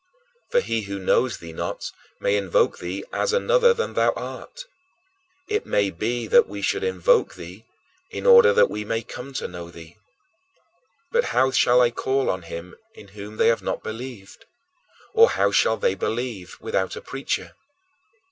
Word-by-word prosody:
For -, -, +3 dB
he 115 Hz, -, -2 dB
who 100 Hz, -1 st, -5 dB
knows 110 Hz, +5 st, +1 dB
thee 85 Hz, -1 st, -10 dB
not -, -, -4 dB, 0.3 s
may 100 Hz, -, +1 dB
invoke 100 Hz, -4 st, +1 dB
thee 90 Hz, +3 st, -5 dB
as 470 Hz, -, 0 dB
another 485 Hz, 0 st, +4 dB
than 470 Hz, 0 st, -2 dB
thou -, -, +2 dB
art. -, -, -8 dB, 0.8 s
It 425 Hz, 0 st, -2 dB
may 100 Hz, -1 st, +1 dB
be 115 Hz, +7 st, -2 dB
that -, -, +5 dB
we 100 Hz, 0 st, -7 dB
should 95 Hz, -, 0 dB
invoke 95 Hz, -2 st, +2 dB
thee 90 Hz, +6 st, -11 dB, 0.4 s
in -, -, -6 dB
order 475 Hz, -1 st, +8 dB
that 475 Hz, 0 st, +5 dB
we 105 Hz, -, -5 dB
may 115 Hz, +2 st, -2 dB
come 125 Hz, +5 st, -9 dB
to 140 Hz, -, -3 dB
know 85 Hz, -1 st, -9 dB
thee. 85 Hz, +2 st, -13 dB, 1.1 s
But 480 Hz, +1 st, +2 dB
"how 130 Hz, 0 st, +4 dB
shall 125 Hz, -1 st, +4 dB
they 120 Hz, -1 st, +4 dB
call 135 Hz, +3 st, 0 dB
on 95 Hz, -, -4 dB
him 85 Hz, +1 st, -8 dB, 0.2 s
in 100 Hz, -, -14 dB
whom 105 Hz, +1 st, -10 dB
they -, -, +4 dB
have 115 Hz, -, +1 dB
not -, -, -3 dB
believed? 115 Hz, -3 st, -8 dB, 0.7 s
Or 460 Hz, +1 st, +7 dB
how -, -, +1 dB
shall -, -, +3 dB
they 485 Hz, -1 st, +1 dB
believe 110 Hz, -7 st, -4 dB
without 95 Hz, -, -2 dB
a -, -, -7 dB
preacher?" 135 Hz, 0 st, -4 dB
110 Hz, 170 wpm, -23 LUFS, 95-135 Hz, 1.1 s, order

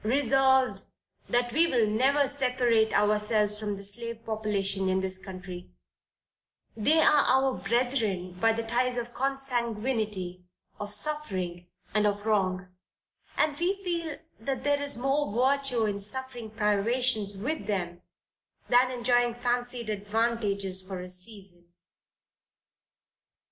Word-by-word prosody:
Resolved, 265 Hz, +2 st, +3 dB, 0.5 s
That 240 Hz, 0 st, +1 dB
we 330 Hz, +3 st, +5 dB
will 240 Hz, -7 st, +2 dB
never 270 Hz, +6 st, +3 dB
separate 250 Hz, -5 st, +1 dB
ourselves 210 Hz, 0 st, +2 dB
from 210 Hz, -1 st, -3 dB
the 200 Hz, -, -9 dB
slave 230 Hz, +3 st, -5 dB
population 200 Hz, -3 st, 0 dB
in 185 Hz, 0 st, +2 dB
this 190 Hz, 0 st, -3 dB
country: 185 Hz, -2 st, -9 dB, 1.1 s
they 290 Hz, +9 st, +3 dB
are 300 Hz, -2 st, +5 dB
our 265 Hz, 0 st, +3 dB
brethren 215 Hz, -3 st, -1 dB
by 225 Hz, +2 st, +4 dB
the 230 Hz, +1 st, -3 dB
ties 245 Hz, +2 st, 0 dB
of 240 Hz, 0 st, -4 dB
consanguinity, 235 Hz, -8 st, -2 dB, 0.4 s
of 205 Hz, 0 st, -5 dB
suffering, 195 Hz, -, -3 dB, 0.3 s
and 210 Hz, 0 st, +3 dB
of 205 Hz, 0 st, -2 dB
wrong; 185 Hz, -4 st, 0 dB, 0.7 s
and 300 Hz, -2 st, +2 dB
we 360 Hz, +3 st, +1 dB
feel 335 Hz, -4 st, -3 dB, 0.2 s
that 265 Hz, +4 st, -3 dB
there 285 Hz, 0 st, +1 dB
is 285 Hz, -4 st, -1 dB
more 275 Hz, +1 st, 0 dB
virtue 255 Hz, 0 st, +3 dB
in 205 Hz, -1 st, -2 dB
suffering 245 Hz, +1 st, -5 dB
privations 215 Hz, 0 st, +1 dB
with 265 Hz, +9 st, -3 dB
them, 175 Hz, -4 st, -2 dB, 0.7 s
than 250 Hz, +1 st, +5 dB
enjoying 245 Hz, -1 st, +1 dB
fancied 245 Hz, -1 st, -2 dB
advantages 205 Hz, -2 st, 0 dB
for 185 Hz, 0 st, -6 dB
a 180 Hz, 0 st, -7 dB
season. 180 Hz, -2 st, -13 dB
225 Hz, 120 wpm, -28 LUFS, 200-255 Hz, 1.1 s, we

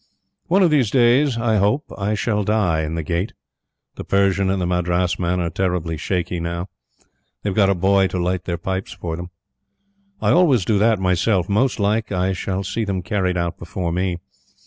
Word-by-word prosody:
One 190 Hz, +4 st, +4 dB
of 170 Hz, -, +4 dB
these 135 Hz, -8 st, +3 dB
days, 125 Hz, +2 st, +3 dB
I 110 Hz, -2 st, +1 dB
hope, 105 Hz, +10 st, +1 dB
I 105 Hz, +1 st, -1 dB
shall 105 Hz, 0 st, 0 dB
die 95 Hz, -6 st, +1 dB
in 80 Hz, +1 st, -3 dB
the 80 Hz, -, -3 dB
Gate. 85 Hz, +5 st, -2 dB, 0.6 s
The -, -, -5 dB
Persian 100 Hz, -1 st, +2 dB
and 95 Hz, 0 st, 0 dB
the 90 Hz, -, -1 dB
Madras 90 Hz, 0 st, 0 dB
man 90 Hz, 0 st, 0 dB
are 85 Hz, -1 st, -1 dB
terrible 90 Hz, -4 st, -1 dB
shaky 90 Hz, +2 st, -2 dB
now. 85 Hz, +2 st, -4 dB, 0.7 s
They've 100 Hz, -, -1 dB
got 100 Hz, -1 st, +3 dB
a 100 Hz, -, +2 dB
boy 95 Hz, +2 st, +3 dB
to 95 Hz, -, -4 dB
light 90 Hz, +1 st, -1 dB
their 85 Hz, -1 st, -2 dB
pipes 95 Hz, +2 st, -4 dB
for 80 Hz, -2 st, -5 dB
them. 85 Hz, +1 st, -7 dB, 0.9 s
I -, -, +2 dB
always 145 Hz, -, +4 dB
do 105 Hz, -3 st, +2 dB
that 110 Hz, +1 st, +3 dB
myself. 90 Hz, 0 st, +1 dB
Most 120 Hz, +5 st, +1 dB
like, 105 Hz, +2 st, 0 dB
I 95 Hz, 0 st, 0 dB
shall 95 Hz, +1 st, -3 dB
see 110 Hz, +4 st, -2 dB
them 95 Hz, -3 st, -2 dB
carried 90 Hz, -1 st, -1 dB
out 85 Hz, -1 st, -2 dB
before 85 Hz, 0 st, -4 dB
me. 90 Hz, 0 st, -1 dB
95 Hz, 190 wpm, -21 LUFS, 90-105 Hz, 0.9 s, One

